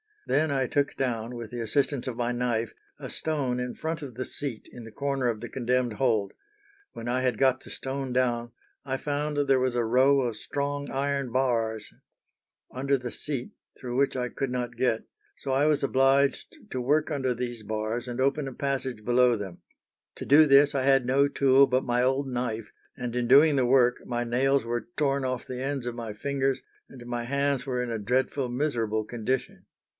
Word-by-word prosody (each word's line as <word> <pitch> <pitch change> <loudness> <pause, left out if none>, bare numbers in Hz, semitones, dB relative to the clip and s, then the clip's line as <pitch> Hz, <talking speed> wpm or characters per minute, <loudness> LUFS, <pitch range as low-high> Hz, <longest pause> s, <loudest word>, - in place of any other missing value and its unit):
Then 155 +2 +2
I 135 -2 +1
took 140 +2 0
down, 120 -2 -2
with 115 -2 -7
the 120 - -5
assistance 135 +3 0
of 125 - -3
my 120 0 -1
knife, 120 -2 -1 0.2
a - - -7
stone 140 -6 -1
in 125 0 -3
front 160 0 -3
of 135 -5 -8
the 130 - -3
seat 135 -6 -6
in 120 - -10
the 110 - -10
corner 140 0 -1
of 115 -3 -1
the 120 - -6
condemned 125 -1 0
hold: 110 -4 +1 0.6
when 115 - -7
I 125 +1 0
had 125 -4 +1
got 130 -1 +3
the - - -14
stone 135 -1 -4
down, 120 -2 0 0.3
I 135 -1 -1
found 145 +1 -2
there 135 -1 +4
was 130 -1 0
a 120 - +2
row 130 +4 +4
of 120 -4 -2
strong 145 0 -3
iron 140 -1 -1
bars 115 -4 0 0.8
under 140 +2 0
the 125 -2 -6
seat 135 -5 -4 0.3
through 125 -1 -4
which 140 0 +2
I 125 -1 -1
could 135 +2 -3
not 125 -1 -3
get, 120 -3 +1 0.3
so 135 - -4
I 135 +2 +3
was 150 -2 +2
obliged 135 +1 +2
to 130 - -2
work 150 +5 +1
under 130 -4 0
these 120 -1 -4
bars 110 +3 -3
and 120 +1 -3
open 140 +1 +1
a 135 - -6
passage 130 -4 -3
below 125 +1 +4
them. 100 -5 -7 0.6
To - - -7
do 150 +3 +7
this 140 +1 +6
I 135 -2 0
had 135 -1 +4
no 135 +3 +3
tool 135 -1 +5
but 130 0 +1
my 120 0 +1
old 135 +2 +1
knife, 120 -4 -3 0.2
and 125 -2 -5
in 120 -1 0
doing 145 +4 +7
the 130 - +3
work 125 -1 +4
my 120 0 -2
nails 135 +3 +2
were 120 0 -3
torn 140 -2 +1
off 130 -1 -2
the 125 0 -5
ends 135 -2 -2
of 120 - -3
my 115 -3 -6
fingers, 135 +3 -1 0.3
and 125 -3 -12
my 120 -1 -3
hands 140 0 0
were 125 -1 -1
in 120 - -4
a 115 - -2
dreadful, 125 +4 0
miserable 120 -5 -1
condition. 120 +3 -3
130 Hz, 200 wpm, -27 LUFS, 120-140 Hz, 0.8 s, do